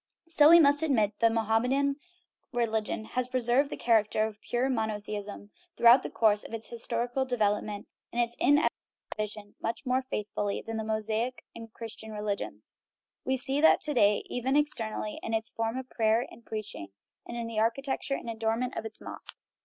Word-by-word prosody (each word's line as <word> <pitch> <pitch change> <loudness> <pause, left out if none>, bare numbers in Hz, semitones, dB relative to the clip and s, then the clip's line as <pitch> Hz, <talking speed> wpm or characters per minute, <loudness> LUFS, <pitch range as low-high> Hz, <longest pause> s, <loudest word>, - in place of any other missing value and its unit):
Still, 305 -2 +6
we 340 +1 +9
must 285 -1 +5
admit 230 -10 +1
that 230 - +5
the - - +1
Mohammedan 250 +6 +1 0.5
religion 220 -3 -1
has 250 +2 -2
preserved 255 +2 +2
the - - -5
character 215 -2 +2
of 215 -1 -7
pure 245 +2 0
monothe 220 -5 -2
ism 205 0 -7 0.3
throughout 235 +3 +7
the - - -5
course 210 -2 +2
of 230 - -6
its 225 - -7
historical 240 +2 -1
development 210 -4 -1 0.2
and 240 - -3
its 240 0 0
inevitable 290 +2 +3 0.4
division 210 -1 -5
much 230 +4 -3
more 255 +1 +2
faithfully 210 -5 -3
than 225 0 -4
the 220 - -2
Mosaic 220 +3 -2
and 230 -1 -9
Christian 220 -1 -7
religions. 210 -1 -5 0.5
We 265 0 +1
see 270 +2 -1
that 320 - +6
to 300 - +1
day, 205 -5 +3
even 255 +3 -1
externally, 225 -8 -1
in 225 - -2
its 220 0 -2
forms 225 +2 -2
of 260 - -9
prayer 225 +1 +2
and 235 - -14
preach 215 -2 -5
ing, 100 - -8 0.4
and 235 - -6
in 235 - -3
the 230 -1 -3
architecture 270 +5 0
and - - -7
adornment 225 +2 -1
of - - -4
its 220 - -4
mosques. - - -9
230 Hz, 185 wpm, -29 LUFS, 215-255 Hz, 0.5 s, we